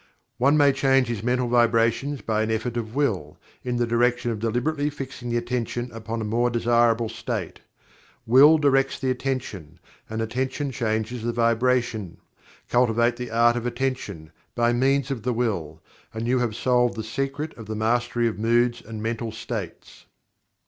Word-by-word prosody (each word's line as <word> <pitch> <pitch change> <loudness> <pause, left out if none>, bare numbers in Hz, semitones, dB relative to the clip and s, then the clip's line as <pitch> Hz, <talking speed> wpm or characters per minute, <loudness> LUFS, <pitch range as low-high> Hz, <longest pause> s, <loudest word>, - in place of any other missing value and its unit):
One 140 +4 +4
may 145 -1 +5
change 135 -2 +2
his 115 -4 -3
mental 125 +1 0
vibrations 120 +3 +2
by 110 -1 0
an 110 - -1
effort 110 +2 -2
of 115 0 -4
Will, 140 -10 -1 0.3
in 125 -1 -2
the 120 - +1
direction 120 +1 +1
of 110 - -4
deliberately 125 +7 0
fixing 135 -4 -7
the 120 - 0
Attention 120 0 -3
upon 115 0 -5
a - - -3
more 120 +3 +1
desirable 120 -1 +2
state. - - -5 0.7
Will 140 +7 +7
directs 135 -2 +2
the 130 -1 -1
Attention, 120 - -4 0.3
and 110 0 -4
Attention 130 +5 -2
changes 115 -1 -2
the 120 +1 -1
Vibration. 115 -5 +1 0.5
Cultivate 120 -1 +2
the 125 -1 -5
Art 120 +1 +3
of 120 0 -2
Attention, 120 -10 -3 0.2
by 120 0 +2
means 135 +2 +1
of 130 -4 -3
the 125 +3 -1
Will, 90 -10 -2 0.3
and 115 +1 -3
you 125 +1 +2
have 120 -3 -1
solved 125 0 +2
the 110 - -4
secret 135 +7 -3
of 115 -2 -10
the 110 - -4
Mastery 120 +2 +1
of 110 - -3
Moods 120 +1 +2
and 110 -1 -8
Mental 115 0 -3
States. 110 -6 -7
120 Hz, 165 wpm, -24 LUFS, 115-125 Hz, 0.7 s, Will